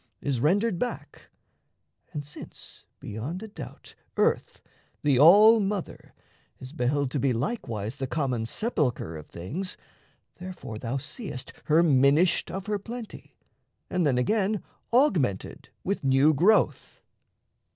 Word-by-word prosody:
Is 130 Hz, -4 st, -2 dB
rendered 190 Hz, -, +2 dB
back; 245 Hz, -, -5 dB, 0.8 s
and 150 Hz, -3 st, -5 dB
since, 145 Hz, -, -11 dB
beyond 130 Hz, -, -5 dB
a -, -, -6 dB
doubt, 205 Hz, -, -10 dB, 0.2 s
Earth, -, -, +1 dB, 0.4 s
the 140 Hz, -4 st, +3 dB
all 210 Hz, +9 st, +8 dB
mother, 200 Hz, -2 st, -4 dB, 0.4 s
is 130 Hz, +2 st, -10 dB
beheld 140 Hz, 0 st, 0 dB
to 145 Hz, -, -1 dB
be 130 Hz, -1 st, +2 dB
Likewise 115 Hz, -, -3 dB
the 135 Hz, -, -3 dB
common 130 Hz, -6 st, -1 dB
sepulchre 130 Hz, -, -1 dB
of 75 Hz, -1 st, -9 dB
things, 155 Hz, -, -5 dB, 0.6 s
Therefore 180 Hz, -12 st, -8 dB
thou 120 Hz, +3 st, -3 dB
seest 135 Hz, -, -6 dB
her 160 Hz, +2 st, +4 dB
minished 145 Hz, +3 st, +4 dB
of 190 Hz, 0 st, -5 dB
her 210 Hz, -1 st, -1 dB
plenty, 230 Hz, +2 st, -9 dB, 0.6 s
And 180 Hz, -1 st, +1 dB
then 140 Hz, -5 st, +2 dB
again 205 Hz, -, +1 dB, 0.3 s
augmented 175 Hz, -, +1 dB
with 200 Hz, -3 st, -2 dB
new 135 Hz, +3 st, +4 dB
growth. 190 Hz, +10 st, +2 dB
150 Hz, 125 wpm, -27 LUFS, 130-200 Hz, 0.8 s, all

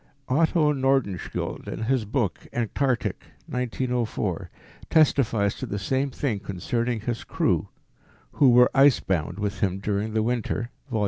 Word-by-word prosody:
Otto 155 Hz, +2 st, +3 dB
Nordenskjold, 135 Hz, -8 st, -1 dB
in -, -, -4 dB
his 125 Hz, -1 st, +1 dB
book 110 Hz, -3 st, -2 dB
Antarctic 120 Hz, +2 st, -1 dB, 0.2 s
(1904), 125 Hz, -1 st, -2 dB, 0.4 s
testifies 115 Hz, -10 st, +3 dB
to -, -, -6 dB
the 100 Hz, -, -3 dB
same 135 Hz, +7 st, 0 dB
thing 125 Hz, -5 st, -2 dB
concerning 115 Hz, +4 st, -2 dB
his 120 Hz, +1 st, -3 dB
crew, -, -, 0 dB, 0.6 s
who 140 Hz, -, +4 dB
were 125 Hz, 0 st, +6 dB
ice 140 Hz, -2 st, +6 dB
bound 85 Hz, -1 st, -2 dB
with 105 Hz, -1 st, -3 dB
him 95 Hz, -2 st, 0 dB
during 105 Hz, +2 st, -2 dB
the 110 Hz, -1 st, +1 dB
winter 120 Hz, 0 st, -2 dB, 0.2 s
(Vol. 115 Hz, -3 st, -1 dB
120 Hz, 135 wpm, -25 LUFS, 105-135 Hz, 0.6 s, were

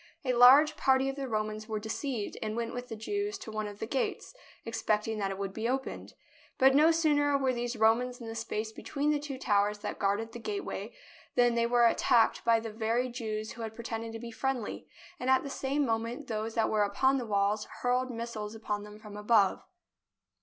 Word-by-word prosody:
A 255 Hz, -, +2 dB
large 270 Hz, +6 st, +7 dB
party 265 Hz, -1 st, +3 dB
of 270 Hz, -, -4 dB
the 275 Hz, -1 st, -4 dB
Romans 215 Hz, -1 st, -3 dB
were 220 Hz, -1 st, -2 dB
deceived 220 Hz, +1 st, -3 dB
and 215 Hz, 0 st, -3 dB
went 230 Hz, 0 st, -3 dB
with 245 Hz, 0 st, -5 dB
the 225 Hz, -, -5 dB
Jews 405 Hz, -, -3 dB
to 220 Hz, -, -9 dB
one 215 Hz, -1 st, -3 dB
of 205 Hz, -1 st, -8 dB
the 220 Hz, -, -4 dB
gates, 260 Hz, +3 st, -2 dB, 0.3 s
expecting 220 Hz, -1 st, -1 dB
that 195 Hz, -1 st, 0 dB
it 195 Hz, -, -4 dB
would 195 Hz, -1 st, -4 dB
be 225 Hz, +3 st, -2 dB
opened. 265 Hz, +1 st, -4 dB, 0.4 s
But 265 Hz, +1 st, +6 dB
no 300 Hz, +4 st, +6 dB
sooner 295 Hz, -3 st, +3 dB
were 265 Hz, -2 st, +1 dB
these 240 Hz, 0 st, -3 dB
Romans 235 Hz, +3 st, +2 dB
in 235 Hz, -, -8 dB
the 225 Hz, -, -5 dB
space 225 Hz, -1 st, -3 dB
be -, -, -11 dB
tween 290 Hz, +1 st, 0 dB
the 295 Hz, -, +1 dB
two 285 Hz, -2 st, -6 dB
towers 205 Hz, -3 st, +1 dB
that -, -, -4 dB
guarded 205 Hz, +3 st, 0 dB
the 240 Hz, -, -8 dB
gateway, 400 Hz, -, -4 dB, 0.4 s
than 245 Hz, -1 st, +4 dB
they 235 Hz, 0 st, +2 dB
were 240 Hz, 0 st, +4 dB
attacked 230 Hz, 0 st, +3 dB
by 230 Hz, -1 st, +4 dB
the 225 Hz, -1 st, -6 dB
very 230 Hz, +3 st, 0 dB
Jews 220 Hz, -3 st, -4 dB
who 235 Hz, -, -9 dB
had 220 Hz, -1 st, -5 dB
pretended 230 Hz, -1 st, -5 dB
to 225 Hz, -, -6 dB
be 235 Hz, 0 st, -7 dB
friendly, 255 Hz, -2 st, -3 dB, 0.3 s
and 255 Hz, -, -2 dB
at 265 Hz, 0 st, +4 dB
the 280 Hz, -, -6 dB
same 275 Hz, +2 st, 0 dB
moment 230 Hz, +4 st, -2 dB
those 220 Hz, -1 st, -3 dB
that 225 Hz, -2 st, +1 dB
were 215 Hz, -, +2 dB
upon 265 Hz, +7 st, +2 dB
the 240 Hz, -, -5 dB
walls 205 Hz, 0 st, +1 dB, 0.2 s
hurled 250 Hz, +1 st, +1 dB
missiles 230 Hz, -3 st, -5 dB
upon 210 Hz, -2 st, -3 dB
them 210 Hz, 0 st, -10 dB
from 210 Hz, -1 st, -11 dB
above. 210 Hz, -1 st, +3 dB
230 Hz, 215 wpm, -30 LUFS, 215-260 Hz, 0.4 s, large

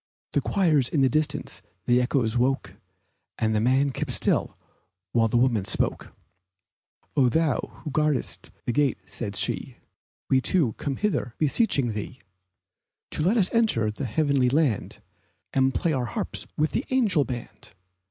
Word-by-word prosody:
The -, -, +2 dB
choirs 155 Hz, -10 st, +2 dB
in 150 Hz, -, +1 dB
the 135 Hz, -, +4 dB
distance 155 Hz, +1 st, -1 dB, 0.2 s
the 125 Hz, +1 st, +3 dB
echoes 125 Hz, -3 st, 0 dB
woke 125 Hz, -6 st, 0 dB, 0.6 s
And 110 Hz, -1 st, 0 dB
the 105 Hz, -, +2 dB
man 135 Hz, +4 st, +2 dB
kept -, -, -4 dB
still -, -, 0 dB, 0.6 s
while 115 Hz, -1 st, +3 dB
the 115 Hz, -, +1 dB
woman 120 Hz, -5 st, +2 dB
spoke: 95 Hz, -, 0 dB, 1.0 s
"Oh, 130 Hz, -3 st, +4 dB
thou 160 Hz, +2 st, -1 dB
who 150 Hz, -, -5 dB
guardest 150 Hz, -1 st, 0 dB, 0.2 s
the -, -, 0 dB
gate," 145 Hz, -2 st, +2 dB
said 100 Hz, +1 st, -5 dB
she, -, -, 0 dB, 0.5 s
"We 130 Hz, -1 st, +3 dB
two 140 Hz, -7 st, +2 dB
come 140 Hz, -2 st, -2 dB
hither 200 Hz, -, -1 dB
beseeching 145 Hz, -, +2 dB
thee 110 Hz, +5 st, -6 dB, 0.9 s
To -, -, -3 dB
let 190 Hz, +9 st, +2 dB
us 190 Hz, -4 st, +3 dB
enter 215 Hz, -, +2 dB
the 130 Hz, +6 st, -5 dB
heavenly 135 Hz, +1 st, +1 dB
land, 140 Hz, -5 st, 0 dB, 0.5 s
And 135 Hz, 0 st, +3 dB
play 160 Hz, +4 st, 0 dB
our 130 Hz, -3 st, -1 dB
harps 115 Hz, -, -3 dB
with 155 Hz, +1 st, +1 dB
the 255 Hz, -, -1 dB
angel 215 Hz, -, +3 dB
band. 120 Hz, -5 st, -8 dB
135 Hz, 150 wpm, -25 LUFS, 120-155 Hz, 1.0 s, the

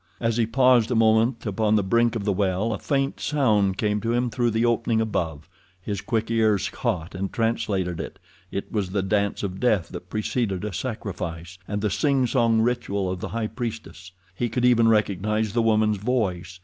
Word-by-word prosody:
As 115 Hz, -1 st, 0 dB
he 115 Hz, -2 st, +2 dB
paused 125 Hz, -1 st, +4 dB
a 125 Hz, -, 0 dB
moment 115 Hz, +2 st, +3 dB
upon 105 Hz, +1 st, +1 dB
the 105 Hz, -, +2 dB
brink 115 Hz, +4 st, +2 dB
of 105 Hz, -3 st, -3 dB
the 100 Hz, -, +2 dB
well 100 Hz, +3 st, 0 dB
a -, -, -4 dB
faint 135 Hz, -1 st, -1 dB
sound 105 Hz, -10 st, +1 dB
came 105 Hz, 0 st, 0 dB
to 115 Hz, +2 st, -1 dB
him 120 Hz, 0 st, 0 dB
through 120 Hz, +2 st, +1 dB
the 115 Hz, +1 st, +1 dB
opening 115 Hz, -1 st, +1 dB
above. 80 Hz, -9 st, -2 dB, 0.3 s
His 100 Hz, +2 st, -4 dB
quick 115 Hz, -1 st, -2 dB
ears 110 Hz, -3 st, +2 dB
caught 85 Hz, 0 st, -3 dB
and 95 Hz, +1 st, -3 dB
translated 105 Hz, -6 st, -1 dB
it—it 100 Hz, -, -8 dB
was 100 Hz, -4 st, -1 dB
the 95 Hz, 0 st, -1 dB
dance 100 Hz, +1 st, 0 dB
of 95 Hz, -1 st, -4 dB
death 110 Hz, -8 st, +1 dB
that 90 Hz, -, -9 dB
preceded 105 Hz, -2 st, -2 dB
a 105 Hz, -, -4 dB
sacrifice, 90 Hz, -5 st, -5 dB
and 105 Hz, 0 st, -3 dB
the 105 Hz, -2 st, 0 dB
singsong 125 Hz, -5 st, +2 dB
ritual 100 Hz, -5 st, -1 dB
of 90 Hz, -, -4 dB
the -, -, -4 dB
high 115 Hz, -1 st, -2 dB
priestess. 110 Hz, -6 st, -6 dB, 0.2 s
He 120 Hz, +5 st, -2 dB
could 125 Hz, +2 st, 0 dB
even 115 Hz, -2 st, +5 dB
recognize 105 Hz, 0 st, +1 dB
the 120 Hz, -, +2 dB
woman's 110 Hz, -2 st, +2 dB
voice. 95 Hz, -6 st, -2 dB
110 Hz, 190 wpm, -24 LUFS, 100-115 Hz, 0.3 s, even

